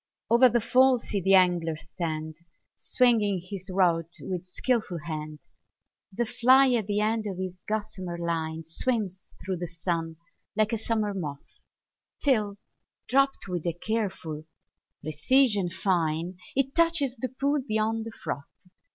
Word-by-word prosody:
o'er 245 +2 +7
the 240 - +2
fall 255 +3 +4
see 210 -4 -3
the 195 +2 +5
angler 175 -3 +3
stand, 155 0 -5 0.4
Swinging 220 -6 +2
his 190 +1 -8
rod 175 -3 +2
with 180 -2 -4
skilful 215 -1 -1
hand; 155 -2 -5 0.7
The 235 +5 -1
fly 255 +3 +5
at 225 -5 +1
the 205 0 0
end 215 0 0
of 190 -3 -4
his 185 -1 -5
gossamer 210 -5 -3
line 165 -1 -2
Swims 190 +2 -2
through 190 -1 -2
the 175 +1 -4
sun 165 -1 -3 0.4
like 215 0 +2
a - - +1
summer 215 -2 -1
moth, 150 -7 -7 0.6
Till, 215 -8 +1 0.5
dropt 275 -1 +2
with 175 -4 -3
a 170 - +1
careful 185 -6 -3 0.6
precision 200 - +3
fine, 175 -1 -1 0.2
It 270 0 +1
touches 330 -6 +2
the 255 +1 -3
pool 280 +3 0
beyond 220 -2 -1
the - - -6
froth. 140 -9 -6
195 Hz, 140 wpm, -27 LUFS, 170-235 Hz, 0.7 s, o'er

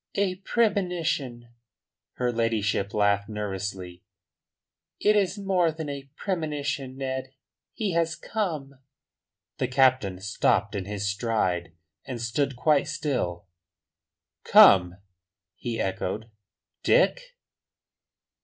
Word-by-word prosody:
"A 195 -2 0
premonition!" 175 - -1 0.6
Her 125 -1 -1
ladyship 110 -3 0
laughed 100 -1 +1
nervously. 95 -4 -5 1.0
"It 210 +1 +4
is 200 0 +1
more 190 -4 +1
than 160 -1 -6
a 140 -1 -7
premonition, 150 -8 -3
Ned. 130 -1 -4 0.4
He 210 -4 -1
has 165 -1 +1
come." 155 -13 -4 0.8
The 130 - +1
captain 125 -7 +2
stopped 100 +1 +1
in 100 -3 -3
his 100 0 -3
stride, 100 -6 -1 0.3
and 125 -2 -6
stood 130 +4 -1
quite 145 +3 +2
still. 105 - -2 1.0
"Come?" 90 -2 +7 0.6
he 115 +4 -4
echoed. 95 +3 -3 0.5
"Dick?" - - +2
130 Hz, 100 wpm, -26 LUFS, 100-160 Hz, 1.0 s, Come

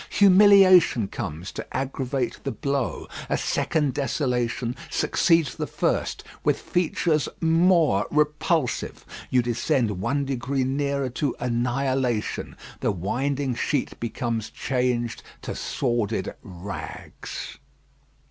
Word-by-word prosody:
Humiliation 190 - +7
comes 80 +5 -5
to - - -6
aggravate 130 -1 -2
the 140 - -2
blow. 140 -3 -2 0.2
A - - +1
second 150 -4 0
desolation 125 -4 -1
succeeds 165 -6 +2
the - - -4
first, - - -1 0.2
with - - +2
features 165 -3 0
more 165 - +3
repulsive. 150 -1 0 0.2
You 125 -1 +3
descend 115 -4 0
one 140 +7 0
degree 135 0 -1
nearer 140 0 -1
to 130 +2 -2
annihilation. 125 0 -1 0.2
The - - +1
winding 130 +9 -1
sheet 135 +3 -1
becomes 115 -1 -2
changed 125 -3 -1 0.2
to - - -4
sordid 120 -6 -1
rags. 95 +2 -7
130 Hz, 100 wpm, -25 LUFS, 120-150 Hz, 0.2 s, Humiliation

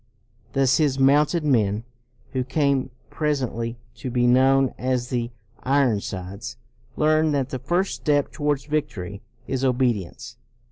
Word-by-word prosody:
Thus 135 -1 +3
his 145 -4 +2
mounted 145 +5 +4
men, 110 -6 +2 0.5
who 130 -1 0
came 140 0 +1 0.2
presently 125 -6 -2 0.2
to 120 +3 -5
be 120 0 +1
known 130 +1 +4
as 125 -1 -1
the 120 -2 -1 0.3
Iron 130 -5 +2
sides, 100 +6 -6 0.4
learned 155 0 +3
that 135 -2 0
the 130 - -4
first 180 +8 0
step 145 -2 +1
towards 145 -3 -1
victory 105 -11 -3 0.2
is 130 0 -2
obedience. 120 -8 -1
130 Hz, 130 wpm, -24 LUFS, 120-145 Hz, 0.5 s, mounted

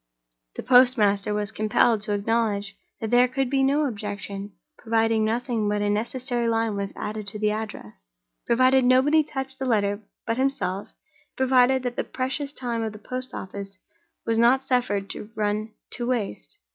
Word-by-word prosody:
The - - -5
postmaster 225 -6 +4
was 210 0 -1
compelled 215 +1 +2
to 210 0 -2
acknowledge 205 -1 -1 0.2
that 220 - -4
there 245 +1 +5
could 260 0 -2
be 270 -1 +2
no 280 +3 +2
objection, 205 -3 -5 0.3
provided 225 0 +1
nothing 225 0 0
but 205 0 0
a 205 - +1
necessary 240 +3 -1
line 225 -2 0
was 200 -1 -3
added 215 -1 -5
to 210 +2 -1
the 210 0 +1
address, 200 - -7 0.4
provided 255 +2 +4
nobody 265 +5 +4
touched 265 -2 -6
the 265 - -2
letter 205 -4 +1 0.2
but 230 0 -1
himself, 260 -8 0
and 310 0 -34
provided 260 0 +4
the 245 -1 -2
precious 270 +2 -2
time 240 -4 -3
of 220 -1 -3
the - - -9
post 255 +4 -4
office 195 0 -7 0.5
was 225 0 +1
not 250 +3 +4
suffered 205 -7 0
to 210 - -6
run 215 +1 -1 0.2
to 240 - -2
waste. 230 - -3
225 Hz, 165 wpm, -25 LUFS, 205-255 Hz, 0.5 s, there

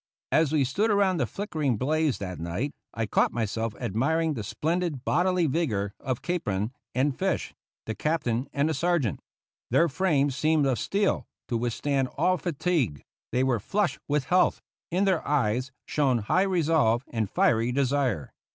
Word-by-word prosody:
As 155 -2 +3
we 155 -3 +3
stood 195 - +1
around 200 -3 +3
the - - 0
flickering 155 - -2
blaze 155 +3 +1
that 90 -3 -6
night 90 - -2 0.2
I 115 - -2
caught - - +2
myself 110 -1 -2
admiring 145 - 0
the 115 -6 -4
splendid 155 - -2
bodily 180 +1 +2
vigor 115 -10 0
of 130 -3 -3
Capron 110 - -1 0.2
and 135 +1 +1
Fish 190 +3 -1 0.3
the 110 - -3
captain 130 -3 -1
and 140 +2 +1
the 160 - 0
sergeant. 170 - 0 0.5
Their 170 - +4
frames 145 -4 +1
seemed 155 0 +2
of 130 -3 +1
steel, 200 0 0 0.2
to 120 - 0
withstand 130 +4 0
all 185 +5 +3
fatigue; 150 - -1 0.3
they 125 +2 +2
were 130 -3 +2
flushed 195 - -1
with 145 -1 +1
health; 180 +7 +3 0.3
in 185 +4 +1
their 190 -4 +2
eyes 130 -2 +1
shone 135 -5 +2
high 115 - +1
resolve 155 -9 +2
and 110 -4 -2
fiery 115 +2 +2
desire. 130 - 0
140 Hz, 160 wpm, -27 LUFS, 115-165 Hz, 0.5 s, Their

